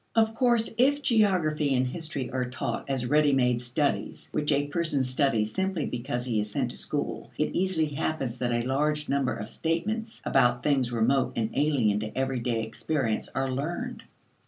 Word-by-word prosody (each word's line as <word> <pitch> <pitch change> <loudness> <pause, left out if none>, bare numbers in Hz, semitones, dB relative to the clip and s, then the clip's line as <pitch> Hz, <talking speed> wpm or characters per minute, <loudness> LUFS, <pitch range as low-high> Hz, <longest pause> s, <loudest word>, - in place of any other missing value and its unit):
Of 220 -1 +3
course 235 -1 +2
if 285 +3 +3
geography 165 - +2
and 130 0 +2
history 140 -1 -4
are 125 -1 -1
taught 130 - -4
as 130 -2 -1
ready 150 +2 +4
made 125 -2 +2
studies 140 +4 -2
which 150 0 0
a 145 0 +2
person 145 -2 0
studies 125 -4 +1
simply 190 -5 -1
because 120 0 -3
he 115 -4 0
is 105 - -4
sent - - -1
to - - -8
school, - - -2
it - - 0
easily 180 -4 +1
happens 140 -4 -2
that 125 -1 0
a 120 0 0
large 150 +3 0
number 140 -2 +1
of 105 - -6
statements 215 - -2
about 120 0 +3
things 135 -5 +2
remote 125 +3 +2
and 110 -1 -1
alien 130 -8 +2
to 110 +2 -6
everyday 125 -4 0
experience 115 +1 -2
are 135 0 0
learned. 175 - -3
140 Hz, 175 wpm, -27 LUFS, 125-160 Hz, -, ready